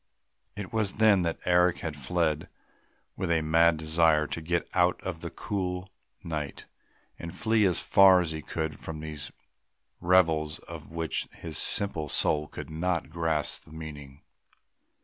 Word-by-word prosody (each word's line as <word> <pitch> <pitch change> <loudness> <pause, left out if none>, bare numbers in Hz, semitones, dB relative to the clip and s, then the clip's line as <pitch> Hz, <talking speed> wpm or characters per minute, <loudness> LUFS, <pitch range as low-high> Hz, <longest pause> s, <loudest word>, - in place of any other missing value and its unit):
It 100 -1 -7
was 110 -3 0
then 105 -3 +4
that 85 -1 -1
Eric 90 0 +3
had 80 -3 -4
fled, 80 +1 -1 0.7
with 95 -2 -3
a 80 -2 +2
mad 80 +1 +4
desire 80 -1 +3
to 80 - -4
get 85 +2 -1
out 90 0 +3
into 90 -3 -4
the 85 +1 -5
cool 95 -1 -4 0.3
night 75 -4 -5 0.5
and 85 - -6
flee 110 +1 +2
as 90 - +1
far 95 -2 +6
as 85 -3 -1
he 80 -1 -4
could 80 +1 -4
from 80 - -6
all 75 - -7
these 75 -2 -5 0.7
revels 80 -4 +3
of 80 -2 -10
which 80 -1 -2
his 80 -3 -6
simple 80 -7 +1
soul 75 +1 +1
could 80 - -8
not 85 0 -1
grasp 80 -3 -2
the - - -17
meaning. 75 -3 -9
80 Hz, 155 wpm, -28 LUFS, 80-90 Hz, 0.7 s, far